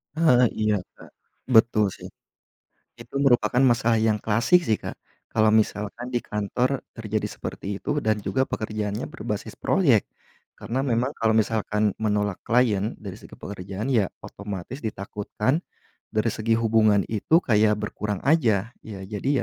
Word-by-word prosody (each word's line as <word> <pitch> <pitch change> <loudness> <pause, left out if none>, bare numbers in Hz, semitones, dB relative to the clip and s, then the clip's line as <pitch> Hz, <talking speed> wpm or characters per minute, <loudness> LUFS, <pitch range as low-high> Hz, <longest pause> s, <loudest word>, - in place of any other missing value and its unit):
Heeh, 140 -7 +5 0.2
iya 105 -1 +2 0.2
Kak, - - -15 0.5
betul 110 -2 +5
sih. - - -9 0.9
Itu 115 +2 -14
merupakan 125 -1 +3
masalah 120 -2 +3
yang 110 -1 +2
klasik 115 - +3
sih 110 - +3
Kak, - - -6 0.3
kalau 110 -1 +3
misalkan 110 +3 0
di 120 - +3
kantor 120 +6 -2
terjadi 110 -1 -2
seperti - - -7
itu - - -5
dan 110 -1 +1
juga 130 - +1
pekerjaannya 110 -2 -3
berbasis 105 0 -5
proyek, 135 - +3 0.6
karna 130 +4 -2
memang 125 +2 0
kalo 110 -1 +2
misalkan 105 -1 0
menolak 105 -2 0
klien 115 -3 +1
dari 100 -3 -7
segi - - -13
pekerjaan 100 +2 -6
ya 115 -8 +2 0.2
otomatis 100 +4 -7
ditakutkan 105 - -2 0.5
dari 110 +2 +1
segi 110 +2 0
hubungan 110 -2 +3
itu 135 - +2
kayak 105 - +3
berkurang 105 -1 -3
aja. 115 - +2 0.2
Ya 100 -3 -8
jadi 105 +6 -3
110 Hz, 140 wpm, -25 LUFS, 105-120 Hz, 0.9 s, Heeh